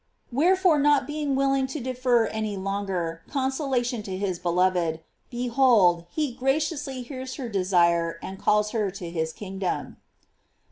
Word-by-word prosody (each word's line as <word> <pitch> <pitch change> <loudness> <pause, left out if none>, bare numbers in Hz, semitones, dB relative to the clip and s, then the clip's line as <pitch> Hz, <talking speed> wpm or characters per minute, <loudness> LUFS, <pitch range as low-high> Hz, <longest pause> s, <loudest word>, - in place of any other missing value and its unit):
Wherefore 345 +4 +3
not 285 -1 +4
be 300 +2 -4
ing 280 -2 0
willing 270 0 +2
to 270 +4 -5
defer 250 -2 +1
any 215 -2 -3
longer 190 -4 -3
consolation 265 -3 -1
to 190 -2 -5
his 185 -3 -2
beloved, 175 -2 +1 0.3
behold, 240 -8 +3
he 300 -5 -2
graciously 270 0 -1
hears 260 0 -7
her 260 - -5
de 200 -4 -1
sire 170 -2 +2
and 190 +2 -8
calls 210 0 +2
her 215 -4 0
to 180 -3 -7
his 160 -1 -2
kingdom. 190 0 -4
230 Hz, 145 wpm, -26 LUFS, 185-270 Hz, 0.3 s, not